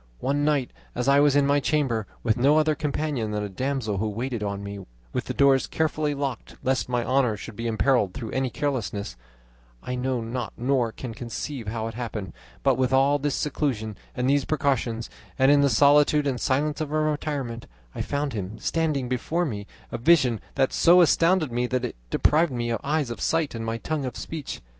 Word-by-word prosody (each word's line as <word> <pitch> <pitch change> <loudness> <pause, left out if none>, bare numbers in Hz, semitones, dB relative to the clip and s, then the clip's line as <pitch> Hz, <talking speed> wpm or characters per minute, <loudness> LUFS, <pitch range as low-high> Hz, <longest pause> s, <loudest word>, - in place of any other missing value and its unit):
One 140 +2 0
night, 145 -4 +1 0.2
as 125 +1 -1
I 140 +1 +6
was 145 -1 +4
in 145 -1 +4
my 140 +1 +3
chamber 130 -8 0 0.2
with 110 -2 +2
no 140 +5 +4
other 155 0 +3
companion 145 -5 -2
than 105 0 -2
a 105 - -4
damsel 120 -2 -2
who 110 +1 0
waited 120 +2 -3
on 100 -1 -3
me, 100 0 -6 0.3
with - - -2
the - - -3
doors 135 -1 +4
carefully 155 -2 0
locked 140 -4 -4
lest 130 -1 0
my 120 -1 0
honour 130 -5 +2
should 110 - -9
be 115 +2 -3
imperilled 115 -3 +2
through 115 -5 -5
any 130 0 0
carelessness, 115 - -3 0.7
I 125 - -4
know 125 0 -1
not 115 0 -4
nor 125 -2 +1
can 120 0 -7
conceive 120 +2 -5
how 110 +1 -3
it 115 - -6
happened, 110 -4 -5 0.3
but, - - +3
with 130 -1 +2
all 135 +2 +4
this 145 -1 -1
seclusion 125 -8 -2 0.2
and 125 0 0
these 140 0 +3
precautions, 130 -6 0 0.3
and 135 +1 +5
in 145 0 +5
the 140 - +4
solitude 145 +3 +5
and 130 -3 -1
silence 145 +3 0
of 155 - -2
my 155 - -2
retirement, 145 -6 -2 0.3
I - - -4
found 145 -1 -2
him 105 0 -5
standing 150 -2 0
before 155 +8 -1
me, 105 -8 -5 0.2
a 120 - -4
vision 125 -5 +4
that 135 -1 +2
so 175 +2 +6
astounded 165 -2 +3
me 120 +1 0
that 125 0 -1
it 120 - -5
deprived 155 +1 +3
my 120 -2 -1
eyes 145 -3 0
of 120 - -6
sight, 165 -3 +1
and 115 -1 -4
my 115 0 -2
tongue 150 +3 -3
of 125 - -5
speech. 160 -4 -6
130 Hz, 200 wpm, -25 LUFS, 115-145 Hz, 0.7 s, I